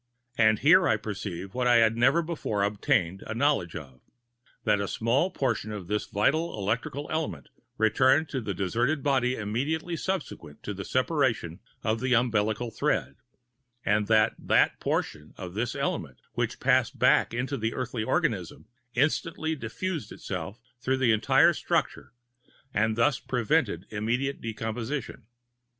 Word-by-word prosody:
And 110 -2 +4
here 175 - +5
I 110 - +3
perceived 100 -3 -6
what 125 -1 0
I 120 - +5
had 115 -1 +5
never 135 +8 +3
before 150 -11 -2
obtained 100 - 0
a 110 - -4
knowledge 135 - +1
of, 65 -5 -9 0.6
that 105 -2 +2
a 100 - -2
small 120 - +1
portion 120 - -1
of 105 -4 -6
this 105 +4 -2
vital 155 +9 +1
electrical 115 +8 -2
element 160 0 -3 0.3
returned 130 +8 +3
to 130 - -3
the 100 -4 -4
deserted 120 - 0
body 130 -3 +2
immediately 140 +11 -2
subsequent 160 - -5
to 105 - -4
the 100 0 -6
separation 130 - 0 0.2
of 110 0 0
the 130 +1 +2
umbilical 115 -1 +1
thread; 70 - -1 0.7
and 105 0 +2
that 110 -1 +4
that - - +2
portion 75 0 -3
of 90 -2 -7
this 115 +4 -2
element - - -3 0.2
which - - -2
passed - - +2
back - - +4
into 125 +4 -2
the 115 -2 -2
earthly 125 -3 -3
organism - - -1 0.3
instantly 160 +4 0
diffused 145 - -4
itself 95 +4 -6 0.2
through 130 +2 0
the 130 -3 +3
entire 110 -1 +4
structure, - - -1 0.6
and 110 +1 +1
thus 120 +3 +2
prevented 125 - 0
immediate 120 +6 -1
decomposition. 115 +2 -4
115 Hz, 145 wpm, -27 LUFS, 105-135 Hz, 0.7 s, here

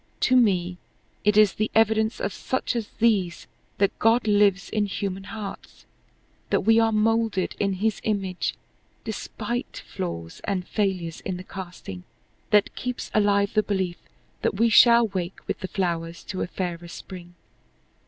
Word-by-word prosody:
To 255 - +4
me 180 -7 +2 0.4
it 210 0 +3
is 210 -2 +6
the 215 0 -1
evidence 220 0 +3
of 200 - -2
such 260 - -2
as 225 -3 -2
these 200 -7 +1 0.3
that 200 0 +1
God 225 +1 +4
lives 205 -2 +3
in 210 -1 +1
human 195 -1 -4
hearts 205 0 -8 0.6
that - - +2
we 225 +3 +5
are 225 0 +3
molded 220 -2 +1
in 200 -1 +1
his 210 +3 -1
image 195 -4 -1 0.5
despite 240 +2 -4
flaws 85 - -6
and 185 -3 -2
failures 185 -6 -1
in 185 -2 -4
the 180 - -8
casting 175 - -8 0.5
that 210 -2 +3
keeps 250 -1 -5
alive 200 -1 +3
the 215 - +4
belief 190 -4 -2 0.4
that - - 0
we 230 +3 +3
shall 235 +1 +7
wake 185 -2 -4
with - - -2
the 185 - -4
flowers 170 -3 -2
to 185 - -5
a - - -1
fairer 175 -2 -4
spring. 175 0 -10
200 Hz, 155 wpm, -25 LUFS, 180-220 Hz, 0.6 s, shall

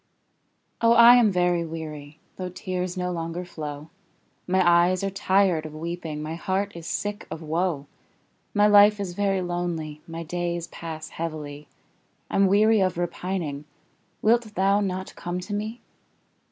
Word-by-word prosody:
Oh, 230 0 +5
I 235 +1 +9
am 225 -4 +4
very 180 -2 +2
weary, 155 -2 -7 0.2
Though 185 -1 -4
tears 180 0 -4
no 180 0 -1
longer 170 +1 -4
flow; 150 -2 -7 0.6
My 185 -1 +3
eyes 175 +2 +4
are 195 - -1
tired 190 -4 +2
of 155 -1 -8
weeping, 160 -2 -5
My 155 +1 -4
heart 190 +4 -1
is 170 -1 -8
sick 205 0 -3
of 160 - -6
woe; 160 -2 -1 0.7
My 205 0 +3
life 210 0 +7
is 190 -3 -3
very 195 -1 0
lonely 170 -4 -3
My 165 0 -6
days 175 0 -3
pass 160 -2 -7
heavily, 150 -3 -6 0.6
I'm 195 0 +4
weary 215 +3 +4
of 185 -2 +1
repining; 175 -4 -3 0.6
Wilt 225 -1 +2
thou 195 +1 +3
not 190 -2 -3
come 175 +1 -4
to 205 +3 -6
me? 215 +3 -4
175 Hz, 150 wpm, -25 LUFS, 165-195 Hz, 0.7 s, I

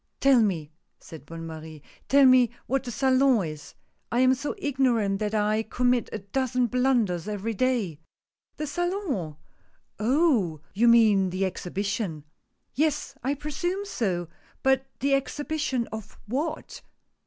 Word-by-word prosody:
" - - -51
Tell 270 -3 +5
me," 165 -8 -1 0.3
said 155 -3 -12
Bonne 165 +1 -7
Marie, 160 -2 -9
— - - -25
" - - -35
Tell 280 0 +6
me 255 -2 +6 0.2
what 270 +1 0
the - - -4
Salon 260 -4 +3
is 155 -1 -8 0.2
— - - -47
I 240 +2 +2
am 255 0 +5
so 285 +7 -3
ignorant 250 - +1
that 215 0 -1
I 215 +1 +2
commit 245 +1 0
a - - -3
dozen 250 +5 -1
blunders 235 -7 +1
every 210 +2 -3
day." 220 - 0 0.6
"The 305 - -3
Salon? 330 - -2 0.6
Oh! 230 - +2
you 225 +5 +3
mean 215 -5 +5
the 185 +2 -1
Exhibition." 190 -3 -3 0.5
"Yes, 295 0 0
I 275 +3 0
presume 350 +7 -3
so 185 - -2 0.2
— - - -33
but 265 0 +2
the 275 +1 +2
Exhibition 285 -2 -1
of 220 -2 -8
what 300 +8 -4
240 Hz, 155 wpm, -26 LUFS, 195-270 Hz, 0.6 s, Tell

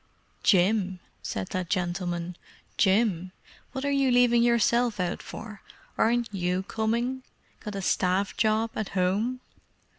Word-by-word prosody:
"Jim?" 190 -1 +3 0.2
said 95 -1 -4
that 185 -2 -3
gentleman. 175 -1 -2 0.4
"Jim? 190 -3 +2 0.4
What 265 +1 -4
are 285 - +1
you 275 -1 +3
leaving 245 -1 +5
yourself 235 -1 +3
out 180 -1 -1
for? 215 -3 -9 0.3
Aren't 235 -1 +1
you 180 0 -1
coming? 235 +5 -1 0.4
Got 210 -2 -7
a 195 - -4
Staff 185 +2 +1
job 220 0 +1
at 215 - -3
home?" 210 +8 +1
210 Hz, 125 wpm, -27 LUFS, 185-235 Hz, 0.4 s, leaving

